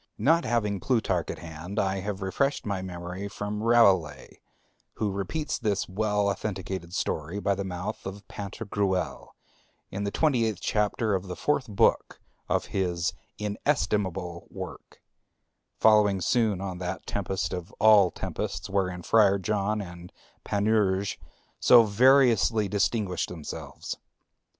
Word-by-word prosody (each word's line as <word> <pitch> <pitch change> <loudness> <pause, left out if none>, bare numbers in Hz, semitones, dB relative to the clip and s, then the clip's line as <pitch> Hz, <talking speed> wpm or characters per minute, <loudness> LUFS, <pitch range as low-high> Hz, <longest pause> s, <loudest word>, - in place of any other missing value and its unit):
Not 165 +9 +3
having 105 -4 0
Plutarch 95 - 0
at - - -4
hand, 85 +5 -8
I 95 -1 +1
have 100 0 -4
refreshed 135 +9 0
my 100 -3 -2
memory 90 +1 -6
from 105 +1 -4
Rabelais, 100 -9 +3 0.5
who 105 -2 -1
repeats 100 - -3
this 105 -5 0
well 105 +1 0
authenticated 95 -3 -4
story 80 +4 -2
by 100 -1 +1
the 100 +1 -3
mouth 95 +3 -5
of 100 +1 -8
Pantagruel, 100 -2 -3 0.6
in 100 +1 -3
the 100 - 0
twenty 125 -1 +2
eighth 110 -2 -2
chapter 105 0 0
of 95 0 -2
the 90 - -5
fourth 140 +2 0
book 105 -3 +1 0.3
of - - +1
his 90 -3 0 0.2
inestimable 100 - -1
work, - - -9 0.7
following 105 -3 +5
soon 105 0 +1
on 95 -2 -5
that 95 +1 -4
tempest 95 -1 -2
of 90 +3 -5
all 105 -4 +6
tempests 75 +2 -5
wherein 90 -3 -1
Friar 100 -1 +4
John 105 +1 -1
and 85 -1 -10 0.3
Panurge 100 -2 +1 0.4
so 120 -2 +7
variously 115 -1 +4
distinguished 100 -2 0
themselves. 80 -4 -7
100 Hz, 130 wpm, -27 LUFS, 95-110 Hz, 0.7 s, so